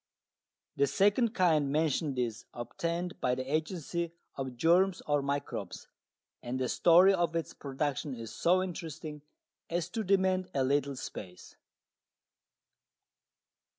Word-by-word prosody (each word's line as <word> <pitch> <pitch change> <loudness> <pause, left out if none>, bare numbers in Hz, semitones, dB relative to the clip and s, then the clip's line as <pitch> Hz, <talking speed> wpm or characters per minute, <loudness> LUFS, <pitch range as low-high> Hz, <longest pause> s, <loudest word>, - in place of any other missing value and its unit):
The 140 - +4
second 210 - +2
kind 155 - +3
mentioned 150 -2 0
is 115 -3 -2
obtained 170 +8 -3
by 125 0 +2
the 130 - -3
agency 160 +3 -2 0.2
of 130 -2 -5
germs 175 +6 +4
or 145 -1 +2
microbes, 140 +1 -4 0.5
and 125 +2 -3
the 130 -1 0
story 180 +3 +6
of 170 -3 0
its 165 - -2
production 140 0 -3
is 115 -2 -8
so 185 +2 +3
interesting 160 -4 -6 0.5
as 170 0 -1
to 220 +3 -2
demand 185 -1 +2
a 135 - +2
little 140 +1 +1
space. 90 -7 -8
155 Hz, 120 wpm, -31 LUFS, 135-180 Hz, 0.5 s, story